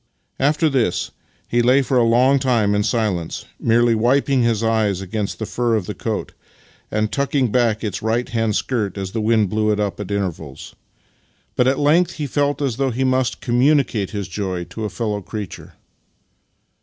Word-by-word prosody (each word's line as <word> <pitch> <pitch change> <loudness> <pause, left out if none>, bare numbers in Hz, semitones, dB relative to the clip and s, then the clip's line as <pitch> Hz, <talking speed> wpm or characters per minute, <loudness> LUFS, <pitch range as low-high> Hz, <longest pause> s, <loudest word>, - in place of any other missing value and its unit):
After 150 +4 +2
this 130 - 0 0.4
he 120 - +2
lay 130 +3 +4
for 135 - -1
a - - +5
long 125 +4 +4
time 120 -6 +2
in 105 - +2
silence, 105 -7 -1
merely 115 +1 +3
wiping 130 +4 +2
his 115 -2 +1
eyes 110 -4 +1
against 100 +2 -4
the 110 - -4
fur 120 +1 0
of 105 -5 -1
the - - -4
coat, - - -4 0.6
and 105 0 -1
tucking 140 -3 0
back 115 -3 +1
its 105 -4 -3
right 115 +3 0
hand 115 -4 -1
skirt 105 -7 -1
as 95 -1 -4
the 110 - -2
wind 110 -3 +2
blew 110 0 +1
it 105 - 0
up 105 -1 -2
at 105 - -5
intervals; 85 -9 -4 0.8
but 125 - +3
at 135 +1 +2
length 155 +5 +3
he 150 - -4
felt 145 +1 0
as 125 -4 -1
though 135 -1 +1
he 130 +2 -1
must 130 -2 0
communicate 125 -4 +2
his 100 -3 -4
joy 95 -1 -3
to 110 +5 -6
a - - -2
fellow 105 -3 -3
creature. 105 -2 -7
115 Hz, 180 wpm, -20 LUFS, 105-130 Hz, 0.8 s, a